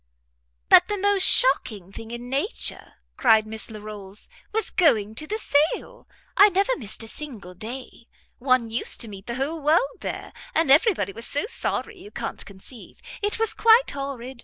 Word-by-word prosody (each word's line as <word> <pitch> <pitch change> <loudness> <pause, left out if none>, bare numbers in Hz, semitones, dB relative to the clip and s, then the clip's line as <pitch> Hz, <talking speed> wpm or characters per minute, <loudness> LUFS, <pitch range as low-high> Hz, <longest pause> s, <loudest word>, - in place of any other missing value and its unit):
"But - - +7
the 415 - -2
most 400 0 +2
shocking 205 - +2
thing 225 +2 -9
in 240 +1 -7
nature," 280 - -2 0.2
cried 220 -3 +4
Miss 220 +1 -4
Larolles, 210 -2 -9 0.2
"was 445 -1 -1
going 220 - +2
to 305 +7 -4
the 430 - -2
sale. 330 +8 0 0.3
I 405 - +8
never 400 +6 +1
missed 220 -3 -3
a - - -9
single 220 -9 -6
day. 235 +4 -8 0.3
One 255 -3 +1
used 230 - -1
to 235 - -4
meet 195 -2 -11
the 235 - -3
whole 295 +5 -3
world 350 - +1
there, - - -6 0.2
and 320 -4 +3
every 370 - +5
body 200 -5 -3
was 230 +3 -6
so 290 - -1
sorry 440 -2 -3
you 405 - -11
can't - - -5
conceive. 200 +5 -12 0.2
It 415 0 -1
was 450 -1 0
quite 460 +2 +5
horrid. 265 -3 -6
265 Hz, 175 wpm, -24 LUFS, -, 0.3 s, I